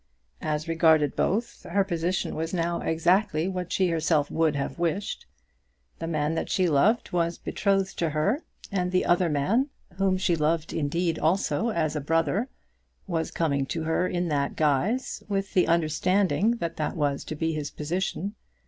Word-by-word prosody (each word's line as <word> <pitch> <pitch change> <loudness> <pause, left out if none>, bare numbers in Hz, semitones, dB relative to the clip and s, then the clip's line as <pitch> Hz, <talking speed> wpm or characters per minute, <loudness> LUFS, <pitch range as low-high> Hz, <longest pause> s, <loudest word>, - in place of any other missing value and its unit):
As 155 +1 -2
regarded 160 -3 +3
both, 220 +6 -1
her 200 +3 +1
position 175 -1 -1
was 160 +3 -3
now 170 0 0
exactly 175 +1 +2
what 180 -2 -4
she 185 -2 +2
herself 160 -3 +1
would 160 -2 +2
have 140 +4 -3
wished. 175 +4 -2 0.7
The 165 - -4
man 155 -1 0
that 165 - -2
she 185 -3 +2
loved 175 +10 +2
was 170 -1 0
betrothed 195 -1 0
to 165 - +1
her, 175 - 0 0.3
and 180 -2 0
the 185 - +2
other 175 0 +3
man, 195 - +1 0.3
whom 190 -1 +2
she 185 -2 +1
loved 160 +1 0
indeed 165 +2 0
also 190 +7 +1
as 160 -7 0
a 150 - -1
brother, 165 - +1 0.6
was 165 -4 -2
coming 140 -4 0
to 165 +3 -3
her 160 +3 +1
in 175 -1 -1
that 140 -2 0
guise, 160 - 0
with 195 -1 -2
the 180 - +3
understanding 185 +7 +2
that 170 -7 -4
that 155 - -2
was 145 -3 0
to 155 - -5
be 160 +1 -1
his 150 -2 -3
position. 185 +6 -3
170 Hz, 165 wpm, -26 LUFS, 155-190 Hz, 0.7 s, regarded